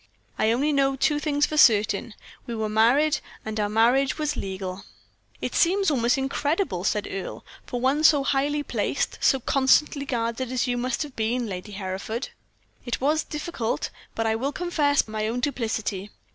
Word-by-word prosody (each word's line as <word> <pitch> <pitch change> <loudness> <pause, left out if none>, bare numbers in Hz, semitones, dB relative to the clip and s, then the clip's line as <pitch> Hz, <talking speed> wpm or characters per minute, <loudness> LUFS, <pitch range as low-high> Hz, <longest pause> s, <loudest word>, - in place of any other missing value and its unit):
I 220 - +3
only 285 +6 +1
know 275 -1 +2
two 295 +2 +1
things 295 -1 +1
for 305 - -4
certain 215 -3 +4 0.3
we 235 - -4
were 220 -1 -1
married, 265 +8 +3 0.3
and 220 0 -3
our 205 -1 0
marriage 245 +5 +3
was 300 -1 -1
legal." 190 0 -5 0.6
"It - - -3
seems 385 +1 +3
almost 245 -1 +2
incredible," 275 - -1
said 210 +1 0
Earle, 195 - -6 0.2
"for 245 - -3
one 270 +5 +1
so 295 -3 +6
highly 285 +2 0
placed, - - -2
so 270 - +4
constantly 275 +2 +2
guarded 235 0 -2
as 255 -1 0
you 245 -1 0
must 250 +4 -1
have 285 -3 -10
been, 235 +2 0
Lady 200 0 -6
Hereford." 195 +5 -4 0.5
"It 240 -2 -3
was 300 +4 +1
difficult; 300 -7 -3 0.2
but 225 - -1
I 220 - +2
will 265 +5 -1
confess 295 -6 +1
my 215 0 -2
own 235 +3 -2
duplicity. 220 -6 -2
250 Hz, 170 wpm, -25 LUFS, 220-290 Hz, 0.6 s, so